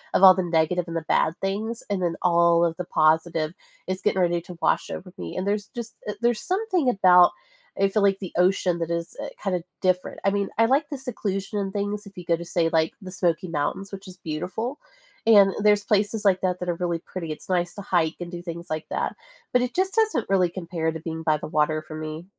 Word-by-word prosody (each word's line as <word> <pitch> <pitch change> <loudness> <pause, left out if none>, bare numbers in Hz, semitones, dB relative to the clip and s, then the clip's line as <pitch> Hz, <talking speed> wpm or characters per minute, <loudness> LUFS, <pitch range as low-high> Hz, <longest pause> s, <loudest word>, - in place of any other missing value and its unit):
of 195 - +3
all 185 -1 +11
the 185 - -1
negative 170 +1 +1
and 165 - -6
the 165 - -1
bad 160 - +2
things, 215 +4 -2
and 195 -2 0
then 170 -1 0
all 170 -1 +4
of 165 - -1
the 180 - -4
positive 160 +1 +2 0.3
is 185 +1 -2
getting 190 - +1
ready 175 -1 +2
to 175 0 -11
wash - - +2
over 180 -1 -7
me, - - -6
and 185 - -2
there's 205 +1 -1
just 235 -1 -6
eh, 210 - -1
there's 235 -2 +2
something 370 - +1
about, 180 -4 +6 0.5
I 195 0 +4
feel 210 +1 +1
like, 195 -1 +4
the 185 - -7
ocean 180 -1 +2
that 165 0 -2
is, 170 0 -3
eh, - - -4
kinda 180 -4 -1 0.2
different, 185 -1 0
I 195 - +5
mean, 200 -1 -1
I 225 - +5
like 280 +4 +2
the 285 - -4
seclusion 205 -5 -3
and 195 -1 -2
things 205 +1 -2
if 195 - -15
you 180 - -8
go 170 0 +3
to, 170 - -7
say, 170 -1 +1
like, 160 -1 +1
the 185 -1 -8
Smoky 175 -1 0
Mountains, 165 +6 -2
which 195 0 -8
is 185 0 -11
beautiful, 185 - -4 0.5
and 200 -3 +7
there's 205 -1 +4
places 210 +1 +1
like 190 -2 +4
that 180 -1 0
that 180 - -3
are 175 - 0
really 170 -1 -1
pretty, 165 -2 -6
it's 155 - -8
nice 175 -1 0
to 200 - -6
hike, 170 -4 +1
and 175 - -5
do 175 - -6
things 170 0 -7
like 155 0 -3
that, - - -1 0.4
but 250 - +4
it 250 - -3
just 380 +1 0
doesn't 435 - +1
really 185 -3 +3
compare 170 -3 -2
to 160 - -6
being 160 0 -5
by 155 -1 +3
the - - -7
water 155 0 +1
for 155 0 -10
me. 155 +1 -6
180 Hz, 240 wpm, -25 LUFS, 170-205 Hz, 0.5 s, all